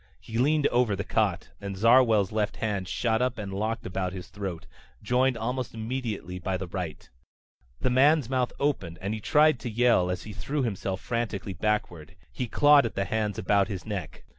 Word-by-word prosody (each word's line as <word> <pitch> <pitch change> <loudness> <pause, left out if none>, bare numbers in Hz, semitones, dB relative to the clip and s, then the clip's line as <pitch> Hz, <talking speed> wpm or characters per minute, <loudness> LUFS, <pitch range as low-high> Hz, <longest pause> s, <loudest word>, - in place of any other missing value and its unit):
He 115 +1 -5
leaned 150 +3 +3
over 120 -4 +2
the 100 - -3
cot 100 -5 0
and 100 -1 -5
Zarwell's 115 -2 +5
left 105 -1 -1
hand 100 -4 -2
shot 110 +4 0
up 125 -1 0
and 100 -3 -5
locked 110 +3 -2
about 90 0 -2
his 95 -1 -8
throat, 95 -4 -6 0.4
joined 125 +3 +2
almost 125 +1 -3
immediately 110 -6 -4
by 95 +1 -2
the 95 - -5
right. 85 -4 -6 0.7
The 130 - +1
man's 140 +1 +4
mouth 125 -1 0
opened 95 - -1
and 100 +3 -3
he 110 - -3
tried 150 +4 +4
to 120 - -5
yell 115 -5 +3
as 90 -1 -3
he 105 - -8
threw 135 +9 -2
himself 95 -4 -3
frantically 115 -5 -3
backward. 90 -5 -2 0.2
He 125 - -3
clawed 145 +1 +5
at - - -9
the 95 - 0
hands 105 -1 -1
about 100 0 +2
his 95 -3 -5
neck. 100 -7 -6
110 Hz, 190 wpm, -27 LUFS, 95-125 Hz, 0.7 s, Zarwell's